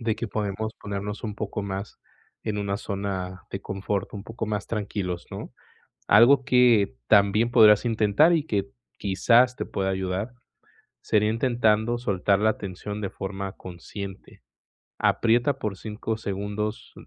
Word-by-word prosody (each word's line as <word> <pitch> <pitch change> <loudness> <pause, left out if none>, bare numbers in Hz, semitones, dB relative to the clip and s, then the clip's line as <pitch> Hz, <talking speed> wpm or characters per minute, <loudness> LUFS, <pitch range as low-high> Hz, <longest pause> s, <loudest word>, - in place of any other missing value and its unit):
de 115 -2 -1
que 115 - -3
podemos 110 +1 -3
ponernos 100 +1 -5
un 105 -3 -4
poco 105 -1 -4
más 100 +1 -5 0.4
en 105 -2 -3
una 100 0 -2
zona 95 -3 -4
de 95 - -4
confort, 95 +1 -3
un 100 0 -7
poco 115 -1 -5
más 105 -1 -3
tranquilos, 100 -5 -3
¿no?, - - -7 0.6
algo 125 +5 +6
que 125 -6 +4
también 105 +2 +4
podrás 105 -1 +6
intentar 115 - +4
y 155 - +1
que, 105 -8 -1 0.3
quizás, 115 +6 +3
te - - -3
pueda 95 -1 -2
ayudar, 95 +5 -2 0.7
sería 105 0 +2
intentando 115 -1 +2
soltar 100 -3 +1
la 110 0 +2
tensión 100 +2 -6
de 100 -3 -3
forma 95 0 -5
consciente, 95 +2 -9 0.6
aprieta 120 +4 +2
por 105 -5 -3
5 110 +1 -4
segundos 105 +1 -4
105 Hz, 140 wpm, -25 LUFS, 100-115 Hz, 0.7 s, algo